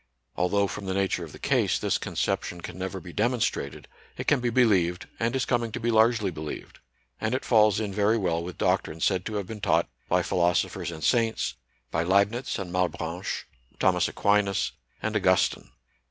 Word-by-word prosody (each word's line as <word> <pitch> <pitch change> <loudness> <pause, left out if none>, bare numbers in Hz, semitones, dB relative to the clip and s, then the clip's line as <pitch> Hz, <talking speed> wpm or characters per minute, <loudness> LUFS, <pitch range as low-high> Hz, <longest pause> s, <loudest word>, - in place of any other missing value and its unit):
Although, 100 +3 +2
from 100 0 -5
the 95 - -1
nature 95 -2 0
of 80 - -8
the - - -11
case, - - +1
this - - 0
con - - -6
ception 85 -1 -1
can 90 - -7
never 95 +1 -4
be 90 -2 -10
demonstrated, 120 +1 -1 0.3
it - - -4
can 145 - +3
be 120 -1 0
believed, 95 -8 +2
and 115 +2 0
is 130 - +1
coming 120 -2 0
to - - -3
be 120 0 0
largely 110 -3 +3
believed; 75 -2 -7 0.4
and 110 +3 0
it 130 - -3
falls 110 -3 +4
in 105 -3 -3
very 105 +3 +3
well 85 -5 0
with 90 0 -7
doctrine 80 - 0
said 90 +1 +1
to 110 - -4
have 100 -2 -2
been 105 +1 -8
taught - - +2 0.2
by - - +3
philosophers 85 -2 +1
and 80 -2 -7
saints, 115 -2 +1 0.4
by 80 - +1
Leibnitz 100 +7 +2
and 95 -4 -5
Malebranche, 90 -1 -2 0.3
Thomas - - +3
Aquinas, 100 -1 +1 0.3
and - - -1
Augustine. - - +2
100 Hz, 185 wpm, -27 LUFS, 90-110 Hz, 0.4 s, falls